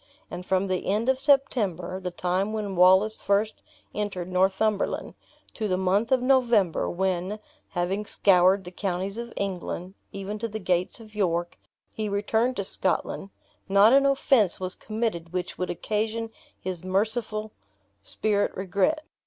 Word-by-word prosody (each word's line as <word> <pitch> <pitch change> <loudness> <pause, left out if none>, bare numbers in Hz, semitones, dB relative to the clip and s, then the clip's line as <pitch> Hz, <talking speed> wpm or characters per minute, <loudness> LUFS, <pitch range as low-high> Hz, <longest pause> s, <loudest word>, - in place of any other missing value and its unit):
And 175 +1 -6
from 190 +1 +1
the 185 -1 -2
end 215 +6 +1
of 265 0 +2
September 215 - +1
(the 185 -1 -4
time 180 +4 -1
when 205 -3 -3
Wallace 190 +4 +5
first 205 +2 0 0.3
entered 195 -4 -3
Northumberland), 190 +3 +1 0.4
to 220 - -2
the 185 -2 0
month 195 +5 +1
of 255 -1 +3
November, 240 -9 +3
when 190 +2 -1 0.4
(having 190 +4 -1
scoured 190 0 +4
the 180 - -9
counties 190 +2 -3
of 235 0 -6
England, 185 -1 -4 0.2
even 200 +2 -5
to 230 - -2
the 220 0 -5
gates 185 0 -1
of 215 -2 -14
York) 175 -4 -1 0.3
he 215 -1 -3
returned 220 +5 0
to 200 - -2
Scotland, 190 +1 -2 0.4
not 200 +4 +6
an 275 0 +5
offense 265 - +3
was 185 0 -3
committed 215 -7 -3
which 180 -1 -3
could 180 - -2
occasion 220 +4 -2 0.3
his 180 -2 -4
merciful 215 +3 -1 0.5
spirit 205 - 0
regret. 200 - 0
200 Hz, 145 wpm, -26 LUFS, 185-220 Hz, 0.5 s, not